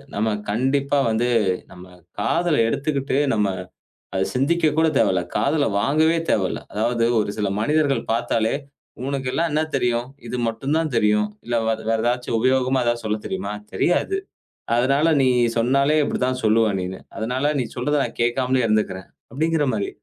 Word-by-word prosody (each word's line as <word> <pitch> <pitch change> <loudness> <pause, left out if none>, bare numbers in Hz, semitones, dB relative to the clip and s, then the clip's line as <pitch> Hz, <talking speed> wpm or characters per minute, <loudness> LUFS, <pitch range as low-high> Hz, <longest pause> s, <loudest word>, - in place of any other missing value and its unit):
நம்ம 110 +2 +1 0.2
கண்டிப்பா 135 +5 +1
வந்து 120 +2 +1 0.4
நம்ப 90 0 -12 0.3
காதுல 170 +8 +1
எடுத்துட்டு 140 +1 -1 0.2
நம்ம 105 -2 +2 0.7
அதை 95 0 0
சிந்திக்க 155 +4 +2
கூட 160 - +4
தேவையில்ல. 95 -2 +2
காதில 145 0 +2
வாங்கவே 155 +6 +3
தேவையில்ல. 95 -3 0
அதாவது 115 +2 0 0.2
ஒரு 100 - -1
சில 105 -2 0
மனிதர்கள் 145 +2 +1
பார்த்தாலே 115 0 0 0.5
"உனக்கெல்லாம் 140 +4 -1
என்ன 155 +1 +1
தெரியும்? 120 -1 0 0.2
இது 125 - -3
மட்டும் 135 +7 -2
தான் 160 -4 -1
தெரியும். 105 -1 +2 0.2
இல்ல 120 -1 0 0.3
வேற 115 - +2
ஏதாச்சி 125 +1 -1
உபயோகமா 130 +1 +2
ஏதாச்சி 120 -1 0
சொல்ல 105 0 -1
தெரியுமா? 190 - -3 0.2
தெரியாது. 390 - +1 0.6
அதனால 140 +6 +2 0.2
நீ 130 - +4 0.3
சொன்னாலே 140 +6 +3
இப்படித்தான் 130 0 -1
சொல்லுவ 110 0 +3
நீன்னு. 95 +1 -5 0.2
அதனால 130 +6 0
நீ - - -2
சொல்றதை 145 +4 0
நான் - - -9
கேட்காமலே 125 +1 +1
இருந்துக்கறேன்." 100 -4 -1 0.2
அப்படிங்கிற 160 +1 +1
மாரி. 100 -2 -1
125 Hz, 145 wpm, -22 LUFS, 110-145 Hz, 0.7 s, கூட